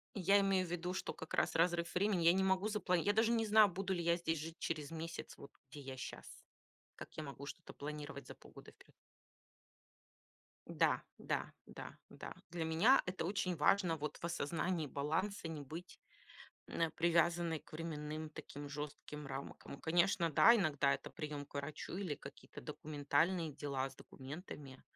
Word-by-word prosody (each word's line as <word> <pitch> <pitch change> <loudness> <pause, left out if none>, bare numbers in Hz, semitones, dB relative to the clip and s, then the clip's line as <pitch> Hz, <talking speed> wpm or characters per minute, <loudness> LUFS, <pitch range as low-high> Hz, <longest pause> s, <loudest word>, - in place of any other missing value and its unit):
Я 195 +1 +5
имею 195 -2 +3
в - - -8
виду, 175 +1 -2
что - - -3
как 160 - -9
раз - - +2
разрыв 170 0 +2
времени. 190 -2 +2
Я 170 - +8
не 190 +1 +3
могу 190 +2 +3
запла 210 -4 0
я 205 +4 +3
даже 225 +2 +4
не 225 -1 +3
знаю, 215 0 +7
буду 190 +1 -2
ли 175 -2 -1
я 170 0 +3
здесь 165 -2 0
жить 165 +2 -6
через 155 -2 -2
месяц, 165 +1 -5
вот 140 - -11 0.2
где 145 - -9
я 135 -1 -6
щас. 125 - -6 0.7
Как - - -9
я 155 - -2
могу 140 0 -7
что-то - - -8
планировать 145 0 -6
за - - -7
полгода - - -14
вперёд? - - -21 1.7
Да, - - +3 0.2
да, - - -2
да, - - -8
да. - - -7 0.2
Для 165 -1 -2
меня 190 +12 +6
это 185 -2 -2
очень 185 -1 0
важно 170 +2 +4
вот 150 -1 -4
в - - -19
осознании 170 0 0
баланса, 165 +8 -1
не 160 -2 -4
быть 160 +6 -8 0.7
н - - -2
э, 165 - +3
привязанной 170 0 +3
к - - -21
временным 155 -1 -4
таким 145 -2 -8
жёстким 150 0 -6
рамкам. 135 +1 -7
Конечно, 170 0 +3
да, 235 - +8
иногда 150 - +3
это - - -7
приём 150 -3 -5
к - - -26
врачу 150 +4 -5
или 185 -7 -1
какие-то - - -11
документальные 155 +3 0
дела 135 -2 -2
с 135 - -16
документами, 140 -1 -9
165 Hz, 175 wpm, -37 LUFS, 150-180 Hz, 1.7 s, Я